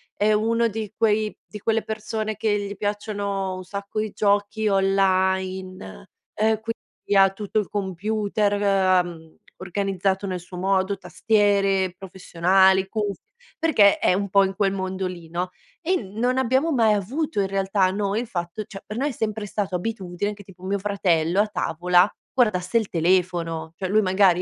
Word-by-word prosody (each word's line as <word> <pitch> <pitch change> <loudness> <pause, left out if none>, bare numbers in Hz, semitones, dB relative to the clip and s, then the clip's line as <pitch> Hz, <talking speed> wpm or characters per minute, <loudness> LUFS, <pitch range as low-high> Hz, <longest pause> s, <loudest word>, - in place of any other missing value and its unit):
è 215 +1 +2
uno 230 +2 +2
di 215 -1 -5
quei 215 -1 +1
di 210 - -9
quelle 225 +1 0
persone 220 0 -4
che 205 -2 +1
gli 200 0 -5
piacciono 205 -2 -2
un 185 - -7
sacco 200 +2 -5
i 215 0 -1
giochi 205 +1 +1
online, 190 - 0 0.3
ehm, 220 0 +1
quindi 225 -2 -5
ha 195 -1 +7
tutto 210 +2 -2
il 205 - -3
computer, 205 +2 -1
ehm, 185 -5 +1 0.2
organizzato 195 +1 -1
nel 185 -2 -3
suo 180 +1 -11
modo, 190 +1 +1
tastiere 200 -3 +1
professionali, 190 +1 +2
cuff 205 -1 -3 0.4
perché 235 -12 +5
è - - +3
un 200 +1 -1
po' 200 +1 +5
in 190 0 -2
quel 195 -1 +1
mondo 190 0 -3
lì, 170 -3 -8
no? 180 +2 -2 0.3
E 365 +3 +1
non 225 +6 -1
abbiamo 260 +6 +2
mai 225 -6 +4
avuto 220 - -2
in 195 - +1
realtà 195 0 +1
noi 200 +2 -1
il 245 - -6
fatto 175 0 -4
cioè 195 -1 -10
per 215 - -6
noi 285 +3 0
è - - -3
sempre 215 -3 -3
stato 195 -2 -3
abitudine 195 0 -3
che 205 0 -13
tipo 185 -1 -17
mio 195 +2 -1
fratello 185 -3 +1
a 215 - +1
tavola 180 -1 +2 0.3
guardasse 215 -5 +2
il 220 -3 0
telefono. 170 -2 0
Cioè 185 - -3
lui 215 +2 +4
magari 185 -2 +3
195 Hz, 165 wpm, -23 LUFS, 185-215 Hz, 0.4 s, ha